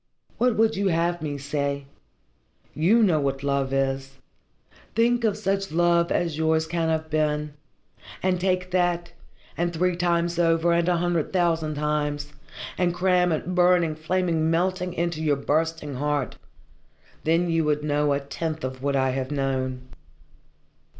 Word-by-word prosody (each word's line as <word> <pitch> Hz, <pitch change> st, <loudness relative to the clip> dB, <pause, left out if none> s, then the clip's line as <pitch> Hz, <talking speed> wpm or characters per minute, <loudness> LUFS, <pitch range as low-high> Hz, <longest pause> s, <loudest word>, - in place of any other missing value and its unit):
What 245 Hz, -1 st, +3 dB
would 225 Hz, 0 st, +3 dB
you 200 Hz, 0 st, 0 dB
have 170 Hz, 0 st, 0 dB
me 145 Hz, -2 st, -3 dB
say? 140 Hz, 0 st, -2 dB, 0.9 s
You 205 Hz, +9 st, +3 dB
know 170 Hz, -7 st, +3 dB
what 135 Hz, -1 st, -2 dB
love 140 Hz, -1 st, 0 dB
is. 135 Hz, 0 st, -1 dB, 0.8 s
Think 235 Hz, +1 st, +2 dB
of 210 Hz, -2 st, +1 dB
such 195 Hz, -2 st, -1 dB
love 170 Hz, +1 st, +2 dB
as 165 Hz, -3 st, 0 dB
yours 160 Hz, 0 st, +2 dB
can 165 Hz, 0 st, -1 dB
have 160 Hz, 0 st, -2 dB
been, 150 Hz, -1 st, 0 dB, 0.7 s
and 180 Hz, -1 st, +1 dB
take 185 Hz, -1 st, +2 dB
twice 185 Hz, 0 st, -14 dB
that, 175 Hz, -1 st, 0 dB, 0.4 s
and 175 Hz, 0 st, 0 dB
three 180 Hz, +2 st, 0 dB
times 170 Hz, -1 st, 0 dB
over, 165 Hz, 0 st, +3 dB
and 170 Hz, +1 st, +2 dB
a 175 Hz, -, +2 dB
hundred 170 Hz, -2 st, 0 dB
thousand 165 Hz, -4 st, +1 dB
times, 150 Hz, 0 st, -2 dB, 0.5 s
and 175 Hz, -1 st, +1 dB
cram 180 Hz, -1 st, +2 dB
it, 160 Hz, +3 st, -2 dB
burning, 175 Hz, -2 st, +3 dB
flaming, 160 Hz, 0 st, 0 dB
melting 180 Hz, +1 st, 0 dB
into 170 Hz, -2 st, -1 dB
your 150 Hz, -2 st, +2 dB
bursting 155 Hz, +1 st, -1 dB
heart 145 Hz, +1 st, -1 dB, 0.9 s
then 165 Hz, +2 st, +2 dB
you 165 Hz, -1 st, +2 dB
would 150 Hz, 0 st, 0 dB
know 145 Hz, -1 st, +1 dB
a 140 Hz, -, 0 dB
tenth 155 Hz, +3 st, -4 dB
of 130 Hz, 0 st, -5 dB
what 140 Hz, 0 st, 0 dB
I 130 Hz, -1 st, +2 dB
have 130 Hz, 0 st, -3 dB
known. 130 Hz, -2 st, -2 dB
165 Hz, 155 wpm, -25 LUFS, 145-175 Hz, 0.9 s, What